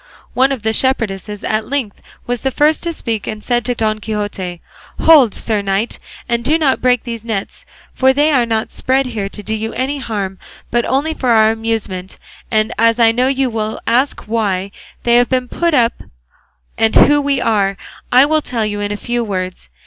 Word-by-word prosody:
One 265 +2 +3
of 260 -5 -3
the 220 0 +1
shepherdesses, 210 -6 -1
at 215 0 -1
length, 260 -8 -3 0.2
was 245 -1 -2
the 265 - 0
first 300 +4 +2
to 340 - -2
speak 230 -9 -3
and 215 -1 -5
said 240 -1 0
to 245 - -1
Don 215 -1 0
Quixote, 205 -5 -4 0.4
"Hold, 290 -9 +6
sir 215 -3 -1
knight, 200 +3 -2 0.3
and 235 0 -1
do 305 +6 +3
not 290 -5 +1
break 250 -1 +2
these 230 -2 -6
nets; 220 -4 -5 0.3
for 265 0 +4
they 295 +3 +2
are 250 -5 +2
not 220 -1 -1
spread 265 +1 +1
here 215 -5 -4
to 210 - -8
do 220 - -3
you 220 +1 -3
any 270 +3 -2
harm, 200 -6 -4 0.3
but 240 0 +1
only 280 +5 0
for 255 -5 -2
our 220 -1 +5
amusement; 220 -5 -3 0.3
and 215 -1 +1
as 230 +1 +3
I 230 -1 +6
know 250 +3 +1
you 270 -2 0
will 220 -1 -3
ask 250 +5 +1
why 200 -4 -1 0.3
they 240 0 +4
have 245 0 +3
been 255 -1 0
put 340 +4 0
up, 235 -3 +3 0.9
and 225 0 +2
who 290 0 +6
we 280 -1 0
are, 200 -4 +1 0.3
I 255 +3 +7
will 310 +1 +1
tell 230 -6 -2
you 205 -1 -3
in 205 0 -2
a 205 - -3
few 240 +3 -2
words. 185 - -4
230 Hz, 200 wpm, -16 LUFS, 215-260 Hz, 0.9 s, I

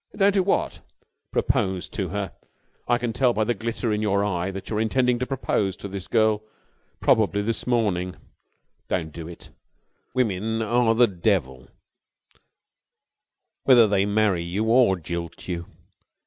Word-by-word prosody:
"Don't 200 0 +4
do 195 - +3
what?" 190 - 0 0.5
"Propose 95 -1 0
to 95 -3 -3
her. 100 0 -4 0.5
I 120 - +3
can 120 -1 -3
tell 125 +1 +2
by 110 - +1
the 120 +3 +1
glitter 115 +1 -2
in 105 - -1
your 100 -1 +1
eye 90 -2 -1
that 95 0 -7
you 105 - -2
are - - +1
intending 125 +2 +1
to 125 - -2
propose 105 -7 -1
to - - -7
this 95 -2 -6
girl 110 -2 +2 0.6
probably 100 -2 +3
this 115 +3 -2
morning. 100 -7 0 0.7
Don't 80 -4 -2
do 80 -1 -7
it. 85 - -11 0.6
Women 110 -1 0
are 115 +1 +2
the 120 +2 +6
devil, 85 - -1 2.0
whether 125 -4 +7
they 100 -1 +2
marry 105 -4 +2
you 90 +5 -2
or 115 -3 +4
jilt 85 0 -6
you. 85 -2 -4
105 Hz, 150 wpm, -24 LUFS, 95-115 Hz, 2.0 s, whether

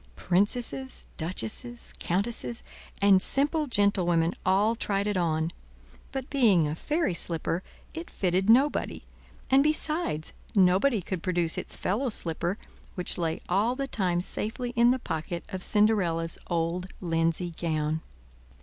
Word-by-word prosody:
Princesses, 240 +8 0
duchesses, 185 - -4
countesses, 225 +5 -2 0.4
and 195 -2 +6
simple 295 - +2
gentlewomen 180 -7 +3
all 205 +4 +3
tried 200 -2 -1
it 210 -1 -1
on, 160 -2 0 0.6
but 265 -1 -4
being 210 - +4
a 150 - -2
fairy 300 - -1
slipper, 165 0 -1 0.3
it 330 +1 -7
fitted 190 +2 0
nobody; 270 +6 +3 0.5
and 265 +1 +7
besides, 305 - 0 0.2
nobody 195 +4 +4
could 185 -1 -4
produce 175 -3 0
its - - -3
fellow 240 +8 0
slipper, 175 -1 -2 0.4
which 180 -1 0
lay 165 -2 -1
all 210 +7 +2
the 275 +1 -2
time 185 -9 0
safely 235 +6 -2
in 235 0 +4
the 255 - +3
pocket 170 -5 -4
of 185 - -5
Cinderella's 185 -6 +2
old 170 +1 -1
linsey 165 0 0
gown. 160 -1 -1
190 Hz, 130 wpm, -28 LUFS, 170-235 Hz, 0.6 s, and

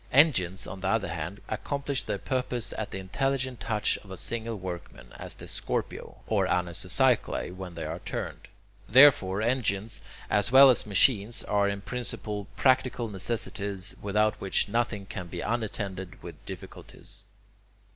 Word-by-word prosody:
Engines, 110 - +4
on 95 0 -8
the 95 - -1
other 100 -2 +1
hand, 85 +4 -5
accomplish 140 +5 -2
their - - -1
purpose 125 +1 -2
at 110 - -3
the - - -5
intelligent 130 +6 -1
touch 110 -2 0
of 100 - -17
a 95 - -7
single 115 +4 -2
workman, 90 -4 -8
as - - -6
the - - -11
scorpio - - -4
or - - +1
anisocycli 90 +5 +1
when 90 -2 -8
they 80 -1 -4
are 80 +3 -4
turned. - - -5 0.4
Therefore 110 -6 +6
engines, 115 -3 0 0.3
as 105 +2 +1
well 135 +1 +10
as 120 - 0
machines, 105 +2 +4
are, 100 -1 +2
in 100 0 -3
principle, 105 -2 -4
practical 130 -3 +2
necessities, 100 -1 -3
without 105 +1 +2
which 95 - +1
nothing 110 -2 -1
can 95 -2 -6
be 85 0 -5
unattended 100 -5 -3
with - - -10
difficulties. - - -10
105 Hz, 145 wpm, -28 LUFS, 95-120 Hz, 0.4 s, well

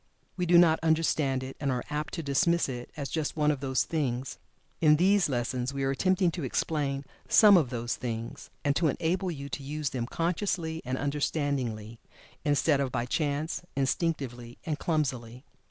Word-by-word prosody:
We 180 -1 -1
do 175 0 +6
not 165 -2 +6
understand 155 -5 +1
it, 130 +1 -7
and 140 - -1
are 125 -1 -1
apt 150 0 -3
to 165 - -4
dismiss 170 +5 +2
it 125 -2 -6
as 140 -2 -3
"just 160 -1 -2
one 150 0 +3
of 145 - -3
those 130 -1 +1
things." 130 -5 -2 0.4
In 155 -2 +6
these 190 +2 +3
lessons 125 +1 -2
we 135 - -1
are 135 - +1
attempting 185 +5 +2
to 165 -1 -5
explain 140 +1 -1 0.2
some 210 -2 +8
of 155 -8 +3
"those 120 -4 -3
things," 115 -2 -5 0.2
and 145 -1 +2
to 165 - +2
enable 180 +6 0
you 140 -4 -5
to 140 - -5
use 145 0 -3
them 120 -3 -3
consciously 165 -1 -1
and 130 +1 -2
understandingly, 140 -6 -2 0.4
instead 145 0 +2
of 135 -2 -1
by 120 -1 -1
chance, 150 +4 -1
instinctively, 135 -4 -2
and 155 -2 -2
clumsily. 130 -6 -2
145 Hz, 175 wpm, -29 LUFS, 130-160 Hz, 0.4 s, some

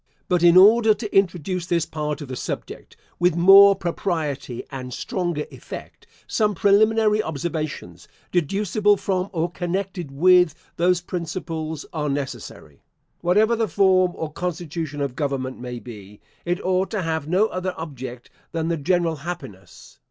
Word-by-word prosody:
But 180 -2 +1
in 175 +1 +6
order 215 +3 +7
to 215 -2 -7
introduce 180 -2 +1
this 170 -2 +1
part 150 -1 -4
of 145 - -7
the 130 - -5
subject - - -6 0.2
with 175 -1 +3
more 195 +3 +8
propriety, 160 -9 -3
and 130 -2 -6
stronger 175 +2 -3
effect, - - -10 0.2
some 210 -2 0
preliminary 215 +2 +3
observations, 155 - -5 0.2
deducible 200 +4 +1
from, 190 0 -2
or 170 -1 -1
connected 180 -1 -3
with, 180 +3 +4 0.2
those 175 +1 +2
principles, 165 -3 -5
are 150 -2 -2
necessary. 135 - -6 0.4
Whatever 210 +6 +3
the 225 -1 0
form 185 -3 +3
or 155 -1 -5
constitution 165 -4 -4
of 140 -3 -2
government 130 -2 -3
may 125 0 -6
be, 105 -3 -11 0.3
it 175 +1 -1
ought 185 +1 +1
to 210 -4 -2
have 160 -2 -2
no 185 +6 +3
other 185 0 -3
object 130 -6 -8 0.2
than 165 0 -1
the 170 - 0
general 165 +1 0
happiness. 135 - -9
170 Hz, 145 wpm, -23 LUFS, 145-185 Hz, 0.4 s, more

